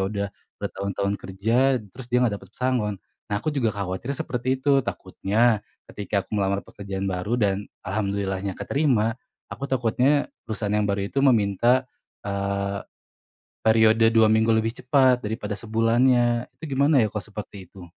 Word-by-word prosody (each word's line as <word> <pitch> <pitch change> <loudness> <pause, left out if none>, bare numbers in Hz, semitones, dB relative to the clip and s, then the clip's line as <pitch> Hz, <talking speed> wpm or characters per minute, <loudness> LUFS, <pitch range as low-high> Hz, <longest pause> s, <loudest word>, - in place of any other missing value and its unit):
udah 100 -1 -2 0.3
bertahun-tahun 100 0 -2
kerja 115 +8 +1 0.2
terus 125 -1 -10
dia 125 0 +3
nggak 100 -4 -1
dapat 95 - -15
pesangon. 125 -5 0 0.3
Nah 105 - -1
aku 150 +9 -2
juga 130 -6 +1
khawatir 100 +8 -3
seperti 130 +2 -1
itu. 140 0 +4
Takutnya 110 0 0 0.3
ketika 100 -1 -2
aku - - -35
melamar 100 0 0
pekerjaan 100 -1 -6
baru 95 +4 -1
dan 100 -3 0 0.2
alhamdulillahnya 100 -1 -2
keterima, 125 -7 +1 0.4
aku 140 - -5
takutnya 130 +3 +2 0.2
perusahaan 105 -1 -2
yang 105 -1 +1
baru 100 0 0
itu 135 - +1
meminta, 120 0 +3 0.4
eee, 100 0 -2 0.9
periode 110 0 +5
2 110 -1 +5
minggu 110 +1 +3
lebih 110 +1 +1
cepat 130 -1 +4
daripada 105 -1 -3
sebulannya. 120 +2 +2
Itu 150 -3 -6
gimana 140 0 +4
ya 110 - +1
kalau 105 0 -5
seperti 100 -2 -8
itu? 95 -2 -12
110 Hz, 145 wpm, -24 LUFS, 100-125 Hz, 0.9 s, periode